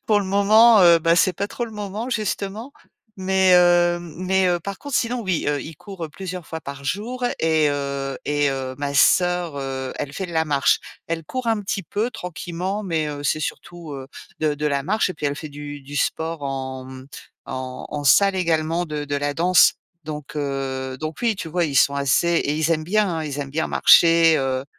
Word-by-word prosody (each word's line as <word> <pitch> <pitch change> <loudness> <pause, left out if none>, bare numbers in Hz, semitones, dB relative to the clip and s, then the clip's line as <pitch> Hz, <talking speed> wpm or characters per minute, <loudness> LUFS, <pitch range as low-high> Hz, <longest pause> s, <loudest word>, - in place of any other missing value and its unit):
pour 210 -2 +4
le - - -3
moment, 210 +3 +5
heu, 170 -2 +7
ben 165 +1 +3
c'est 180 0 +3
pas 200 - -2
trop 240 +3 -4
le 225 - -11
moment, 210 +2 -5
justement, 215 +1 -3 0.5
mais 190 0 +3
heu, 175 -1 +4
mmh 170 -3 -10
mais 190 0 +2
heu, 175 -1 +1
par 200 +3 -6
contre, 285 -2 -6
sinon 245 +1 0
oui, 190 -5 -1 0.2
il 155 +1 -9
court 190 -6 -8
plusieurs 185 -3 -7
fois 160 0 -6
par 140 0 -8
jour 240 - -3 0.2
et 160 -2 +3
heu, 140 -1 -3
et 145 -1 +1
heu, 130 -1 -3
ma 140 0 -3
sœur, 175 +1 +3
heu, 130 -1 -4
elle 140 - -4
fait 190 +2 -4
de 170 - -9
la 160 0 +1
marche. 145 -3 +2 0.3
Elle 165 -1 -3
court 255 +3 -4
un 220 -2 +1
petit 195 -1 -3
peu 215 +8 -2
tranquillement, 180 +1 -5
mais 160 -4 -1
heu, 145 -1 -6
c'est 155 - 0
surtout, 170 +1 -6
heu, 135 -1 -7 0.3
de 155 -1 0
de 150 +1 -2
la 140 -1 -1
marche 210 0 +1
et - - -6
puis 150 -1 -3
elle 140 - -1
fait 155 +1 -7
du 145 0 -8
du 145 +2 -8
sport 160 0 -2
en 130 -1 -5
m 130 0 -10 0.4
en 130 -1 -6
en 145 -1 -5
salle 195 +7 +5
également, 165 -1 0
de 150 -2 -4
de 145 0 -2
la 145 0 -2
danse, 180 +3 +5 0.3
donc 150 -1 -7
heu, 135 -2 -3
donc 155 0 -4
oui, 230 -3 +1
tu 165 - -6
vois, 175 +2 0
ils 145 -4 -3
sont 140 +1 +4
assez 140 +4 +2
et 165 -4 +1
ils 160 +1 0
aiment 155 -1 +1
bien, 180 -4 0
ils 145 -1 -4
aiment 140 - -6
bien 160 +3 -1
marcher, 165 -1 +6
heu, 130 -1 -1
165 Hz, 215 wpm, -22 LUFS, 145-190 Hz, 0.5 s, heu